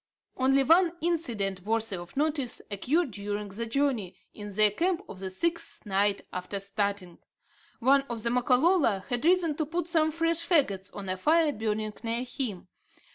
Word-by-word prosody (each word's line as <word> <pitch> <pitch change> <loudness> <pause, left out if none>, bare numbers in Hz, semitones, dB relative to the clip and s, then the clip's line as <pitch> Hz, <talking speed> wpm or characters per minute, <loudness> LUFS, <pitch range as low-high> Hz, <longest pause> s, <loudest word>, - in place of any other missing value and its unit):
Only 270 +1 +3
one 335 +4 +4
incident 235 - -1
worthy 220 +1 -1
of 175 +6 -9
notice 290 -4 0
occurred 270 - 0
during 205 0 -4
the 230 +4 -4
journey, 240 -7 0 0.2
in 205 -1 -8
their 210 +1 +4
camp 350 - 0
of 190 - -10
the 190 0 -4
sixth 335 - -3
night 200 0 +1
after 180 +2 -4
starting. 200 -2 -3 0.6
One 270 +3 +4
of 230 -2 -4
the 235 - 0
Makololo 250 - +3
had 245 +3 -1
risen 340 -3 +3
to 310 - 0
put 340 +2 -2
some 320 -2 +3
fresh 330 +1 0
fagots 265 - +1
on 200 -1 -6
a 185 0 -2
fire 315 - +3
burning 215 -3 -2
near 230 +1 -2
him. 245 -8 -4
235 Hz, 165 wpm, -28 LUFS, 200-315 Hz, 0.6 s, one